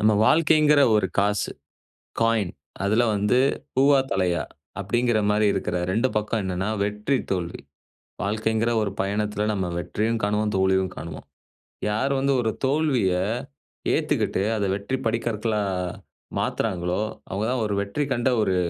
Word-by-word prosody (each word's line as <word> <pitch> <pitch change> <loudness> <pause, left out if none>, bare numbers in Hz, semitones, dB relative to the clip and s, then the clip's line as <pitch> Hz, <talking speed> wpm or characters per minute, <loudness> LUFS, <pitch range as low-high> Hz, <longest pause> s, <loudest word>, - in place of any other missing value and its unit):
நம்ம 110 +1 +4
வாழ்க்கைங்கிற 155 -1 +5 0.2
ஒரு 105 -3 +2
காசு. 105 0 +1 0.7
காயின் 115 -5 +2 0.3
அதுல 110 +4 +3
வந்து 105 +5 +2 0.4
"பூவா? 135 +1 +5
தலையா?" 90 -3 +1 0.4
அப்பிடிங்கிறமாரி 105 -1 +2
இருக்கிற 90 - -2
2 110 +8 +1
பக்கம் 105 +1 0
என்னன்னா, 95 +1 -2
வெற்றி, 105 +6 0
தோல்வி. 90 -3 -2 0.6
வாழ்க்கைங்கிற 110 +3 0
ஒரு 105 -2 -1
பயணத்தில 105 +1 -1
நம்ம 95 -3 -1
வெற்றியும் 110 +5 -1
காணுவோம். 105 +1 +1
தோல்வியும் 95 -1 +2
காணுவோம். 80 -2 -8 0.6
"யார் 110 +7 0
வந்து 140 +1 +2
ஒரு 110 -2 0
தோல்விய 135 -9 +2 0.8
ஏத்துக்கிட்டு, - - 0 0.2
அத 100 - 0
வெற்றி 100 +7 -3
படிக்கற்களா 110 -1 0 0.8
மாத்துறாங்களோ! 90 +1 -1 0.3
அவுங்க 100 +3 -2
தான் 125 -3 0
ஒரு 105 - -1
வெற்றி 100 +9 -2
கண்ட 120 +1 +1
ஒரு 95 -3 +1
105 Hz, 125 wpm, -24 LUFS, 100-120 Hz, 0.8 s, வாழ்க்கைங்கிற